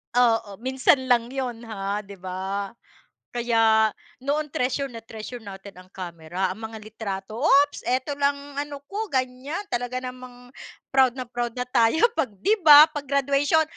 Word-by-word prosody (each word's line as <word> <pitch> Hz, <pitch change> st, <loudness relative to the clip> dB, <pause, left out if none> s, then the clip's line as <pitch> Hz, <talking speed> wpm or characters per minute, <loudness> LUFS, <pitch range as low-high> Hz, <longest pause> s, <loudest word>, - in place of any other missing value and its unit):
Oo, 225 Hz, -4 st, +2 dB
minsan 260 Hz, +1 st, +3 dB
lang 235 Hz, -1 st, +4 dB
'yon, 245 Hz, -3 st, -5 dB
ha, 200 Hz, -1 st, -3 dB
di 200 Hz, -, -10 dB
ba? 190 Hz, +2 st, -4 dB, 0.6 s
Kaya 225 Hz, -2 st, +3 dB, 0.4 s
noon, 300 Hz, +1 st, 0 dB
treasure 270 Hz, +2 st, -1 dB
na 230 Hz, -, -8 dB
treasure 225 Hz, +2 st, -8 dB
natin 200 Hz, -2 st, -10 dB
ang 185 Hz, -, -15 dB
kamera, 180 Hz, 0 st, -4 dB
ang 190 Hz, -, -8 dB
mga 225 Hz, -, -9 dB
litrato. 215 Hz, -1 st, -6 dB
"Oops, 285 Hz, 0 st, +4 dB
eto 255 Hz, +3 st, 0 dB
lang 280 Hz, 0 st, +3 dB, 0.2 s
ano 285 Hz, -1 st, -6 dB
ko," 430 Hz, +2 st, -3 dB
ganyan. 260 Hz, +4 st, -2 dB
Talaga 245 Hz, +1 st, -2 dB
namang 250 Hz, -1 st, -10 dB, 0.4 s
proud 260 Hz, -2 st, +4 dB
na 255 Hz, -, -4 dB
proud 240 Hz, -1 st, -4 dB
na 250 Hz, -, -1 dB
tayo 250 Hz, +3 st, +2 dB
'pag, 320 Hz, -, 0 dB
di 405 Hz, -, +2 dB
ba 300 Hz, -3 st, +10 dB
pag-graduation, 280 Hz, +2 st, +1 dB
245 Hz, 155 wpm, -24 LUFS, 220-275 Hz, 0.6 s, ba